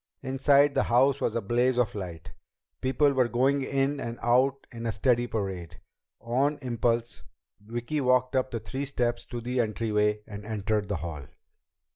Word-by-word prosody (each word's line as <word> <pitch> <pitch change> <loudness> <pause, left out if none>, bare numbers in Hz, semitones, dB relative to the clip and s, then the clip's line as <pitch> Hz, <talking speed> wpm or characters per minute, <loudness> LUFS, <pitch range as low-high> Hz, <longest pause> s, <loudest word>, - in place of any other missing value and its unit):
_ - - -8
Inside, 140 +2 +4
the - - +2
house 135 +3 +4
was 115 - 0
a 115 - 0
blaze 120 +4 +1
of 120 -5 +1
light. 85 -7 -7 0.5
People 135 +2 +2
were 130 -2 +3
going 135 +4 +2
in 135 +1 0
and 115 -3 -5
out 130 +3 +2
in 115 -1 -5
a - - +1
steady 120 +3 +1
parade. 95 -7 -4 0.4
On 135 +6 0
impulse, 120 -1 -1 0.4
Vicki 120 +7 -3
walked 130 0 +2
up 130 0 +1
the 115 - -3
three 135 +5 -4
steps 120 -3 -1
to 120 - -6
the 125 +2 -2
entryway 105 -2 +1
and 105 -1 -8
entered 105 -1 -1
the 100 - 0
hall. 75 -6 -6
120 Hz, 170 wpm, -28 LUFS, 110-130 Hz, 0.5 s, Inside